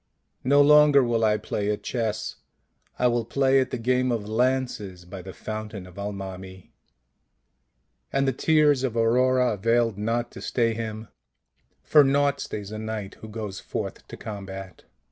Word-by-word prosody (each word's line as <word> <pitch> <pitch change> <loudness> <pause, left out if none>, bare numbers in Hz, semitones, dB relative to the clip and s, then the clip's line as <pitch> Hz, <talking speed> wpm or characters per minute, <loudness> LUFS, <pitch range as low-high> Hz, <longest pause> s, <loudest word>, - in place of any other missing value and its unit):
" - - -47
No 145 0 +7
longer 150 -1 +6
will 115 -2 +1
I 105 -1 +3
play 105 0 -3
at 105 - -2
chess; 115 -4 -3 0.6
I 125 - +1
will 120 -1 +2
play 135 +3 +2
at 130 - 0
the - - -3
game 125 +2 +1
of 110 -3 -2
lances 110 -6 -1
by 90 +1 -8
the 95 +1 -9
fountain 110 0 -6
of 90 +2 -12
Al 100 +1 -3
mami." 95 -1 -9 1.4
And 135 0 +1
the 135 - +2
tears 150 0 +3
of 120 -3 -1
Aurora 125 +2 +3
availed 115 +1 +1
not 115 +3 -1
to - - -10
stay 115 -2 +1
him; 110 -1 -5 0.7
for 150 -2 +6
naught 140 +1 +2
stays 105 -5 -6
a 110 - -5
knight 110 -2 -5
who 110 - -8
goes 105 -3 -6
forth - - -6
to - - -9
combat. 95 -3 -8
115 Hz, 165 wpm, -25 LUFS, 105-130 Hz, 1.4 s, No